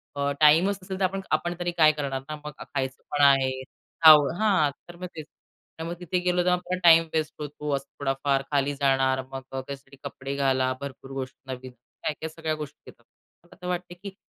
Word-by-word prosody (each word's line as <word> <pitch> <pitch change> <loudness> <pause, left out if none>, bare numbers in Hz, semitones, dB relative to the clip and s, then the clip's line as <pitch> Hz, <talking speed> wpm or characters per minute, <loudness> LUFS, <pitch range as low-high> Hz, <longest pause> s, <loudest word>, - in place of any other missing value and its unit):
अ, 140 0 0
टाइमच 165 +6 +5
नसेल 190 0 -5
तर, - - 0
आपण 195 +1 -2
आपण 175 0 +1
तरी 175 0 -1
काय 155 -2 +7
करणार 140 -3 -3
ना? 155 - -3
मग 150 - -4
खायचं 130 -1 -4
पण 145 0 0
आहे. 130 -1 +4 0.5
आव 150 -2 +9
हां. 190 -9 +3 0.2
तर 175 - -11
मग 180 +1 -6
तेच. 155 -2 -7 0.5
तर - - -3
मग 170 +1 -4
तिथे 180 +1 -1
गेलो 180 0 +2
तर 180 0 0
टाईम 165 -1 +8
वेस्ट 155 -1 -1
होतो, 150 0 -4
असं 135 0 -4
थोडाफार 135 0 0
खाली 145 0 +1
जाणार 135 -1 +2
मग 135 0 -5
त्यासाठी 135 +1 -7
कपडे 135 +1 -5
घाला 130 -2 +2
भरपूर 135 -1 -8
गोष्टी 135 0 -7
नवीन 130 0 -9
काय-काय 150 +6 -6
सगळ्या 160 -1 -3
गोष्टी 150 -2 -8
येतात. - - -30 0.4
मला - - -18
तर 180 - -6
वाटतं 180 0 -3
की 195 -1 -7
145 Hz, 195 wpm, -26 LUFS, 135-175 Hz, 0.5 s, आव